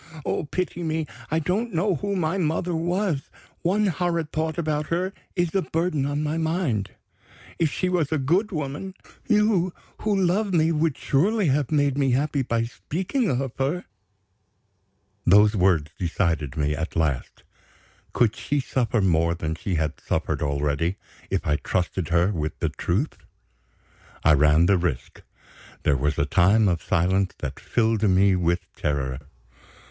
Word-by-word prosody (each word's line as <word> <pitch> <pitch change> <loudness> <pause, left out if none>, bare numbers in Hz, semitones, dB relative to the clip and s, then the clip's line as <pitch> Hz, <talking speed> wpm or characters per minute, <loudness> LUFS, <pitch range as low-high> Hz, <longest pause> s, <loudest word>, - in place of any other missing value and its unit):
Oh, - - -1
pity 175 +3 -3
me! 160 -1 -1 0.2
I 160 - +1
don't 185 +7 -1
know 190 +4 +2
who 200 +6 -2
my 180 +1 0
mother 170 +1 0
was. 175 -2 -1 0.3
One 200 +5 +2
horrid 170 -3 -1
thought 160 0 -2
about 155 -2 -1
her 185 +3 -1 0.2
is 175 -3 0
a 195 - +2
burden 160 -5 -1
on 145 +1 -1
my 155 +2 -1
mind. 160 - 0 0.7
If 160 -3 +2
she 185 - -1
was 175 -5 0
a 160 - +2
good 175 +11 +1
woman, 155 +4 -4 0.3
you 210 -5 +3 0.3
who 210 -1 0
love 190 +2 +1
me 160 0 +3
would 155 -2 +1
surely 190 +6 +2
have 140 0 +1
made 145 -2 +2
me 135 -3 +2
happy 140 +2 +1
by 115 -2 0
speaking 185 - -2
of 135 -1 -1
her?" 145 +7 -1 1.4
Those 105 +4 +5
words 90 -6 +2
decided 80 -5 -1
me 75 0 +1
at 80 +2 -4
last. 75 -7 -1 0.7
Could 115 -3 +2
she 145 0 -1
suffer 120 -3 0
more 85 -2 +2
than 80 -2 -3
she 90 +3 -3
had 80 -1 -1
suffered - - -1
already, 75 +4 0 0.3
if - - -1
I 75 0 +2
trusted 90 +1 -2
her 85 +3 +3
with 75 -5 -3
the - - -1
truth? 105 - -2 1.1
I 75 - +6
ran 75 +3 +5
the 95 0 +4
risk. 80 -8 -3 0.6
There 70 - +3
was 75 +3 0
a 70 - +2
time 100 +7 +4
of 85 -3 +1
silence 95 +3 +1
that - - -5
filled 115 -2 +1
me 95 -1 +4
with 85 0 0
terror. 65 -3 -2
135 Hz, 155 wpm, -24 LUFS, -, 1.4 s, I